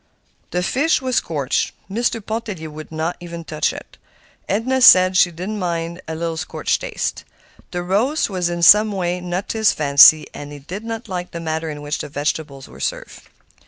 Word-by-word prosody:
The 180 +1 -1
fish 285 - +1
was 255 -2 -1
scorched. 145 -5 -1
Mr. 225 +1 -2
Pontellier 215 -8 -5
would 155 +1 -10
not 160 +3 -3 0.2
touch 155 -1 -1
it. - - -12 0.5
Edna 255 +6 0
said 185 -5 +7
she 180 -1 +5
did 175 +4 -7
not 215 -1 -4
mind 170 -1 -3
a 160 - -4
little 165 0 -3
scorched 160 - -2
taste. - - -4 0.5
The 175 -1 -4
roast 225 - +1
was 180 -4 -2
in 175 0 -3
some 210 +4 +7
way 180 -2 -2
not 180 +2 -4
to 225 - -3
his 220 - +4
fancy, 150 +1 +6
and 145 0 -8
he 145 - -8
did 180 +9 -8
not 225 +1 -6
like 180 -2 -4
the 170 - -7
manner 160 0 -3
in 145 -1 -7
which 145 0 -3
the - - -6
vegetables 145 -1 -4
were - - -14
served. - - -5
175 Hz, 190 wpm, -20 LUFS, 160-215 Hz, 0.5 s, said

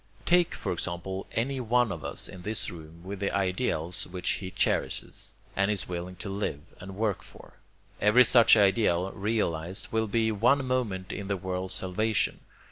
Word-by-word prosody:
Take, 175 -1 +3
for - - -3
example, 90 +2 -4
any 130 +4 -1
one 120 -1 +2
of - - -6
us - - 0
in 90 - -10
this 105 +3 -3
room 80 0 -11
with 95 +1 -6
the 100 - 0
ideals 90 -3 -1
which 90 0 -6
he 95 - -5
cherishes, - - -2 0.2
and 100 +1 +2
is 105 -3 -1
willing 90 +1 -5
to 100 - -8
live 95 -7 -3 0.2
and 95 +1 -9
work 105 -2 -1
for. - - -15 0.5
Every 105 +5 +7
such 120 -2 +7
ideal 95 -3 +3
realized 95 -5 -2
will 110 0 +1
be 110 +1 +1
one 125 +6 +3
moment 115 -8 -1
in 100 - -5
the 100 -1 -1
world's 95 0 -3
salvation. 105 +3 0
100 Hz, 170 wpm, -28 LUFS, 90-110 Hz, 0.5 s, Every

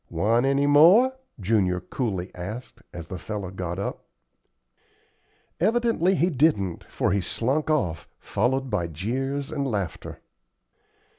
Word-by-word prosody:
"Want 115 +9 +2
any 140 +1 +2
more?" 175 - +6 0.3
Junior 95 -3 +1
coolly 95 -5 -4
asked, 105 +8 -7
as 85 -1 -8
the 90 - -6
fellow 100 -1 -5
got 90 -2 -4
up. 100 - -5 1.5
Evidently 215 -2 +2
he 180 +1 +2
didn't, 125 - +1
for - - -1
he 100 +1 +1
slunk 135 - -1
off, 90 - 0
followed 130 +5 -1
by 90 -5 0
jeers 135 - -3
and 140 -3 -2
laughter. 100 -7 -4
115 Hz, 125 wpm, -25 LUFS, 95-145 Hz, 1.5 s, more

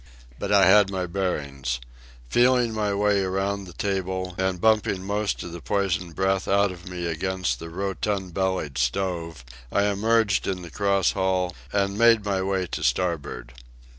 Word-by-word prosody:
But 100 - -3
I 100 -1 +6
had 95 +1 +6
my 95 -2 -2
bearings. 70 -9 -2 0.5
Feeling 120 - +3
my 105 -2 0
way 100 0 +2
around 95 +1 -1
the 90 - -11
table 95 0 -2
and 95 -1 -1
bumping 105 -2 +2
most 100 +1 -1
of 85 - -7
the 85 0 -8
poisoned 95 -4 -1
breath 95 0 0
out 100 0 +3
of 90 0 -10
me 90 -1 -4
against 85 -5 -1
the 85 - -7
rotund 95 +1 -3
bellied 95 -8 -1
stove, 80 0 -2 0.3
I 100 - +2
emerged 105 0 +2
in 90 -2 -2
the 85 - -9
cross 100 -3 +2
hall 95 -2 0 0.2
and 100 0 0
made 115 -2 +5
my 100 -2 0
way 95 -1 0
to 80 - -5
starboard. 70 -9 -1
95 Hz, 165 wpm, -25 LUFS, 90-100 Hz, 0.5 s, I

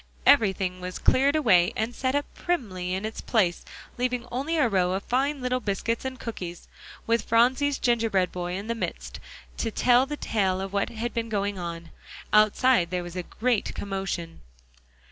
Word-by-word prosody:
Everything 190 -8 +3
was 180 0 -5
cleared 275 +3 +3
away, 200 - +4
and 220 +3 -2
set 260 +2 -1
up 285 - +1
primly 195 - -2
in 190 +3 -3
its 220 - -5
place, 190 -7 +1 0.4
leaving 250 -1 -1
only 280 +7 -1
a 295 -5 +4
row 185 -4 +1
of 195 +1 -2
fine 275 +3 0
little 255 0 0
biscuits 225 +1 -2
and 260 -1 -4
cookies, 180 -7 -6 0.4
with 230 0 +2
Phronsie's 255 +6 +2
gingerbread 225 -6 +1
boy 180 0 -4
in 200 +2 -5
the 230 - -1
midst, 230 - -5 0.4
to 225 - -1
tell 245 +3 +3
the 295 +1 -4
tale 190 -7 0
of 195 0 -5
what 200 - 0
had 235 +1 -4
been 230 -1 -2
going 200 -2 -1
on. 170 -1 -6 0.4
Outside 215 -2 +4
there 180 0 -2
was 175 0 -8
a 180 - -2
great 235 +4 -1
commotion. 190 -4 -4
220 Hz, 175 wpm, -26 LUFS, 185-250 Hz, 0.4 s, away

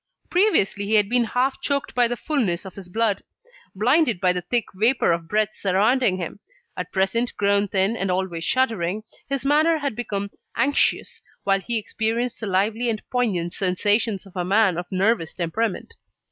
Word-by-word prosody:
Previously, 205 - +2
he 220 - +2
had 205 -1 +3
been 245 0 +2
half 255 +4 0
choked 280 -1 -1
by 245 -1 +3
the 240 +1 -3
fulness 220 - -1
of 190 - -8
his 190 -3 -10
blood, 215 0 0 0.5
blinded 245 - +2
by 180 -1 +3
the 180 - -2
thick 230 +6 0
vapour 225 +2 +2
of 165 -1 -2
breath 215 +2 +1
surrounding 200 +2 +2
him. 180 +2 -6 0.4
At 180 - -5
present, 215 +5 0
grown 200 0 +2
thin, 195 +3 +1
and 195 -4 -2
always 180 -2 -2
shuddering, 215 -5 0 0.3
his 275 -1 -2
manner 310 +3 +4
had 280 -6 -3
become 200 -4 -3 0.2
anxious, 280 +1 +1 0.2
while 195 0 +2
he 235 +4 -2
experienced 225 +2 -2
the 220 - -4
lively 210 +5 +1
and 220 -2 -1
poignant 200 -9 0
sensations 205 +2 +1
of 195 - -16
a 180 - -1
man 195 0 +3
of 175 - -6
nervous 190 -3 +1
temperament. 185 +5 -2
210 Hz, 175 wpm, -23 LUFS, 190-240 Hz, 0.5 s, manner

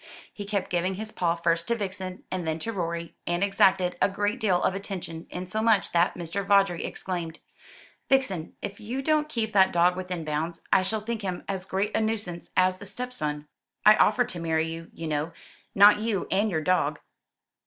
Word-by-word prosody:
He 205 - -7
kept 200 -2 -2
giving 180 +2 0
his 215 +2 -6
paw 170 -4 0
first 170 0 0
to 235 - +1
Vixen 190 -3 -5
and 180 -3 -3
then 160 0 0
to 225 +8 -4
Rorie, 170 -3 -3
and 175 +2 +1
exacted 190 -2 +3
a - - +4
great 205 +4 -1
deal 190 -7 +2
of - - +2
attention, 185 -4 -6
insomuch 210 +4 +1
that 170 +1 +2
Mr. 175 +3 -3
Vawdrey 195 -3 +3
exclaimed: 170 -3 -4 0.7
"Vixen, 200 -12 +1
if 200 0 -5
you 245 +6 -4
don't 305 0 +2
keep 220 -6 -2
that 190 -1 +5
dog 175 +1 +3
within 180 -3 -4
bounds, 155 +3 -3
I - - +6
shall 215 +3 -1
think 230 +1 -4
him 185 -3 -4
as 190 -2 -3
great 195 +3 -1
a 220 - +2
nuisance 205 -6 -3
as 185 0 +3
a - - -7
stepson. 155 -11 -4 0.4
I 215 0 +9
offered 245 +3 +3
to 175 - -6
marry 160 -1 0
you, 165 0 -8
you 165 - -7
know, 155 +1 -2 0.4
not 205 +1 +8
you 215 -3 -1
and 205 +3 +2
your 160 -5 -1
dog." 185 +3 +1
185 Hz, 190 wpm, -27 LUFS, 170-210 Hz, 0.7 s, I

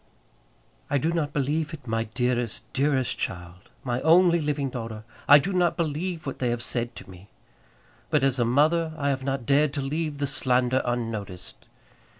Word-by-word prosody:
I - - +2
do 160 +5 0
not 160 -4 -1
believe 150 +3 -1
it, 145 - -16
my 115 -1 -1
dearest, 120 0 -1
dearest 135 -2 +1
child, 90 0 -6
my 125 -1 -2
only 170 +1 +5
living 145 -3 -1
daughter; 115 -3 -6 0.2
I 145 - +10
do 185 +7 -1
not 180 -1 +2
believe 165 +1 -2
what 135 - -5
they 125 - 0
have 120 0 -1
said 120 -1 -1
to - - -10
me. 95 +1 -14 0.8
But 150 -3 +2
as 135 -1 +2
a - - +4
mother 155 +7 +2
I 140 -2 0
have 135 -1 -1
not 135 -2 -2
dared 145 +2 +3
to 140 - -2
leave 150 +1 -2
the 140 - -1
slander 130 -1 +1
unnoticed. 115 -6 -4
135 Hz, 175 wpm, -26 LUFS, 120-150 Hz, 0.8 s, I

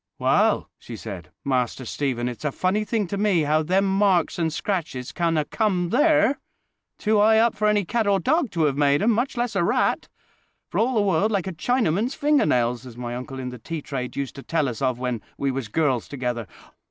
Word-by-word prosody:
"Well," - - +2
she - - -9
said, - - -8 0.2
"Master 130 -1 -1
Stephen, 125 -1 -2
it's 125 +2 -6
a 150 - 0
funny 185 +8 0
thing 215 -1 -1
to 200 +3 -4
me 200 -5 +3
how 155 +1 +2
them 185 +5 +1
marks 195 -3 +2
and 165 -1 +1
scratches 155 -8 -3
can 170 -2 0
'a' 150 - +1
come 185 -2 0
there—too 285 -6 0
high 220 +1 +5
up 230 0 +4
for 215 - 0
any 210 -2 +2
cat 225 +3 0
or 200 -1 +3
dog 290 - +1
to 160 -3 +2
'ave 140 0 -1
made 145 +3 +3
'em, 230 - +4
much 240 +4 -1
less 240 -1 -1
a - - +2
rat: - - +1 0.6
for - - -1
all 250 +2 +1
the 215 - +3
world 195 +1 +2
like 200 -5 0
a 190 - -4
Chinaman's 230 - 0
finger 295 - +2
nails, 120 -2 +1
as 125 -2 -11
my 120 -1 -4
uncle 130 +2 -7
in 130 -1 -4
the 125 -1 -9
tea 160 +4 -6
trade 130 -3 -5
used 140 -2 -3
to - - -6
tell 155 0 0
us 125 0 -5
of 130 -2 +1
when 125 -3 -3 0.2
we 140 -1 0
was 130 -3 -4
girls 130 -1 0
together. 125 -5 -3
165 Hz, 215 wpm, -24 LUFS, 130-210 Hz, 0.6 s, high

